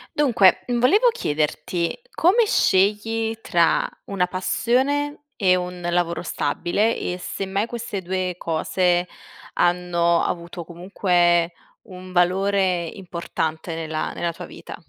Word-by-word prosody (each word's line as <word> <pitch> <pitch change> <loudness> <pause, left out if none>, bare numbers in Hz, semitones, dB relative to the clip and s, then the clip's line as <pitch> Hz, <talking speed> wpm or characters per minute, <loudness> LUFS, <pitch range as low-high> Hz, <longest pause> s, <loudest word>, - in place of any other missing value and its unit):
Dunque, 240 -10 +4
volevo 250 - +3
chiederti 170 - -2
come 425 +7 +4
scegli 220 - +2
tra 170 -5 +2 0.2
una 185 -2 0
passione 265 +11 0
e 185 -3 +3
un 180 0 -4
lavoro 170 -1 0
stabile 175 +7 0
e 180 - -3
se 190 +2 -5
mai 195 +3 0
queste 230 -5 -5
2 185 0 -2
cose 175 +2 0 0.5
hanno 175 -1 +2
avuto 170 0 -4
comunque 175 -1 +1 0.3
un 185 -2 -11
valore 185 0 +2
importante 170 -3 -4
nella 160 -1 -3
nella 170 - -2
tua 180 +2 -8
vita? - - -10
180 Hz, 115 wpm, -22 LUFS, 175-205 Hz, 0.5 s, Dunque